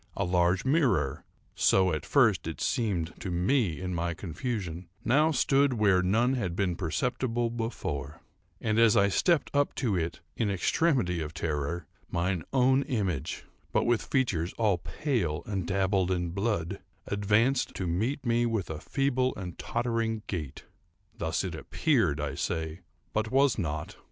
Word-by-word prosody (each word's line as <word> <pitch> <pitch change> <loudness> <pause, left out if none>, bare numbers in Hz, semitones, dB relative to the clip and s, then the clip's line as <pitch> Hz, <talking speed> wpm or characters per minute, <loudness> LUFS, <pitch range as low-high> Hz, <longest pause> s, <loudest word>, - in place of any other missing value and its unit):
A - - +1
large 90 +2 +2
mirror,—so 95 - +1
at 75 - -4
first 110 - +3
it 80 - -5
seemed 95 -10 -1
to 95 - -5
me 90 - +1
in 90 0 -3
my 85 0 -1
confusion—now 100 - -1
stood 140 -1 +3
where 100 -5 +3
none 115 +8 +2
had 95 -10 -2
been 90 -3 0
perceptible 115 - -1
before; 95 - -4 0.4
and, 110 0 +1
as 115 -2 +6
I 100 0 +5
stepped 170 - +2
up 145 0 +1
to 115 -7 0
it 85 -1 -2 0.2
in 110 - 0
extremity 100 - +1
of 80 0 -6
terror, 80 +2 -2 0.2
mine 90 0 0
own 130 0 +4
image, 100 - -2 0.3
but - - +2
with 120 -1 +2
features 95 -11 0
all 105 -6 +1
pale 95 - -2
and 95 -4 -3
dabbled 95 -1 +1
in 90 -2 -1
blood, 100 -3 -1 0.3
advanced 105 +6 +1
to 95 - -3
meet 115 +11 -1
me 120 0 +2
with 110 -7 -2
a 75 - -5
feeble 130 -2 0
and 90 -3 -7
tottering 115 -2 -1
gait. 75 -8 -5 0.5
Thus - - -1
it - - -3
appeared, 110 - +1
I 75 -1 -2
say, 80 0 -3 0.3
but 110 +1 0
was 135 -1 +3
not. 75 -4 -3
100 Hz, 150 wpm, -29 LUFS, 85-120 Hz, 0.5 s, as